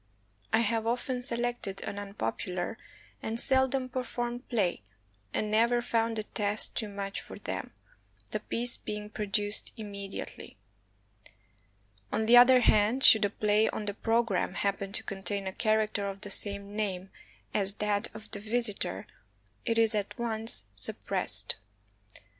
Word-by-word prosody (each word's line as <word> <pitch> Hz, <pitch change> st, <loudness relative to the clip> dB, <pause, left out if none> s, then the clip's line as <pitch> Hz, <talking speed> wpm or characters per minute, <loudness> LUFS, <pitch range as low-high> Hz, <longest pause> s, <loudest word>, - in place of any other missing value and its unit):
I 230 Hz, -, +4 dB
have 225 Hz, 0 st, 0 dB
often 250 Hz, +1 st, -1 dB
selected 240 Hz, -5 st, -1 dB
an 200 Hz, -, -5 dB
unpopular 185 Hz, -, -4 dB, 0.5 s
and 225 Hz, +1 st, -2 dB
seldom 265 Hz, 0 st, +3 dB
performed 245 Hz, -1 st, -4 dB
play, 200 Hz, -, 0 dB, 0.5 s
and 210 Hz, -, -2 dB
never 235 Hz, +3 st, +3 dB
found 230 Hz, -1 st, 0 dB
the 215 Hz, -, -2 dB
test 210 Hz, 0 st, +3 dB
too 220 Hz, -, -2 dB
much 200 Hz, -1 st, -4 dB
for -, -, -10 dB
them, -, -, -5 dB, 0.6 s
the -, -, -1 dB
piece 240 Hz, +1 st, +1 dB
being 210 Hz, 0 st, -6 dB
produced 205 Hz, 0 st, -2 dB
immedi 200 Hz, -2 st, -7 dB
ately; -, -, -8 dB, 1.6 s
on 220 Hz, -, 0 dB
the 235 Hz, +2 st, +6 dB
other 250 Hz, +1 st, +8 dB
hand, 220 Hz, +4 st, +3 dB
should 220 Hz, -2 st, +8 dB
a -, -, 0 dB
play 210 Hz, +1 st, +2 dB
on 210 Hz, -, -4 dB
the 205 Hz, -, -2 dB
pro 225 Hz, +3 st, +1 dB
gramme 195 Hz, -4 st, -2 dB
happen 200 Hz, -1 st, -2 dB
to -, -, 0 dB
contain 195 Hz, 0 st, -3 dB
a 190 Hz, -, -4 dB
character 215 Hz, -1 st, +1 dB
of 195 Hz, 0 st, -6 dB
the 205 Hz, -, -4 dB
same 200 Hz, 0 st, +3 dB
name 195 Hz, -3 st, -3 dB, 0.4 s
as 200 Hz, -1 st, +3 dB
that 210 Hz, -1 st, 0 dB
of 215 Hz, 0 st, -11 dB
the 205 Hz, -, 0 dB
visitor, 215 Hz, -, 0 dB, 0.6 s
it 230 Hz, -, 0 dB
is 225 Hz, -1 st, +4 dB
at 205 Hz, -2 st, -3 dB
once 225 Hz, -1 st, -1 dB
suppressed. 100 Hz, 0 st, +1 dB
215 Hz, 145 wpm, -29 LUFS, 200-235 Hz, 1.6 s, other